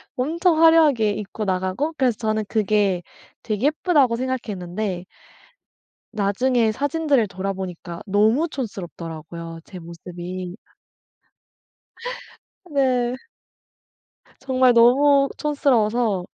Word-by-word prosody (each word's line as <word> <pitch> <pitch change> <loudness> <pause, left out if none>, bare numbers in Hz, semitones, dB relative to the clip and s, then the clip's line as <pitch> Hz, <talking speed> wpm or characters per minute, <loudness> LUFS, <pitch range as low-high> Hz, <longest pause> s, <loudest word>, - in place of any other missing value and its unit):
엄청 325 +5 +1
화려하게 300 -10 +5
입고 210 +1 -5
나가고, 190 - -1
그래서 250 -5 +1
저는 215 -1 -1
그게 205 -4 +1 0.4
되게 215 +4 -2
예쁘다고 295 -6 +2
생각했는데 205 -7 -3 1.1
나중에 220 +3 +1
사진들을 285 -2 +1
돌아보니까 185 -3 -5
너무 220 - +3
촌스럽더라고요 170 - -7
제 185 - -11
모습이. 175 +2 -7 2.1
네. 255 -5 +1 1.2
정말 260 -2 +3
너무 275 +4 +5
촌스러워서 240 - +1
220 Hz, 235 characters per minute, -22 LUFS, 190-265 Hz, 2.1 s, 화려하게